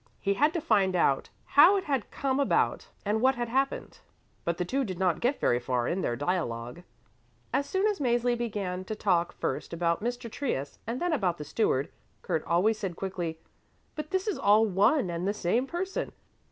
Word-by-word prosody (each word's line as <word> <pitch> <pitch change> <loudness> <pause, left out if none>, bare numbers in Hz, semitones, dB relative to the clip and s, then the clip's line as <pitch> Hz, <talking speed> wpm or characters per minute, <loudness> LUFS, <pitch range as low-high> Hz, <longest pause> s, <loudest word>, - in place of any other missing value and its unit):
He 200 - +1
had 295 +9 +3
to 335 - -1
find 195 - +2
out 140 -6 +2 0.2
how 335 +8 +7
it 385 - -2
had 270 - -1
come 270 0 -1
about 280 - +1 0.2
and 210 +2 +1
what 265 +1 +4
had 240 -1 -3
happened, 270 +3 -1 0.4
but 170 0 -1
the 180 - -1
two 270 +9 0
did 185 -7 -4
not 180 -3 +1
get 255 +4 0
very 120 - +2
far 125 -1 -1
in 185 +3 -1
their 120 - -1
dialogue. 125 -3 -2 0.7
As 280 - +1
soon 380 +2 +1
as 420 -4 +1
Mäzli 240 -2 +2
began 200 -6 -3
to 215 - -4
talk 175 -5 +1
first - - -4
about 170 +2 0
Mr. 240 0 -3
Trius 215 - -3
and 235 +3 -2
then 350 -1 0
about 185 - 0
the 150 - -7
Steward, 145 -11 0 0.3
Kurt 155 - -1
always 205 +6 +2
said 190 -5 -3
quickly, 175 -4 -4 0.6
"But 305 -1 -6
this 380 +2 -1
is 415 - -1
all 210 +2 +5
one 205 - +2
and 170 +2 -2
the 205 - 0
same 225 +8 0
person. 370 +4 -3
210 Hz, 195 wpm, -28 LUFS, 175-270 Hz, 0.7 s, how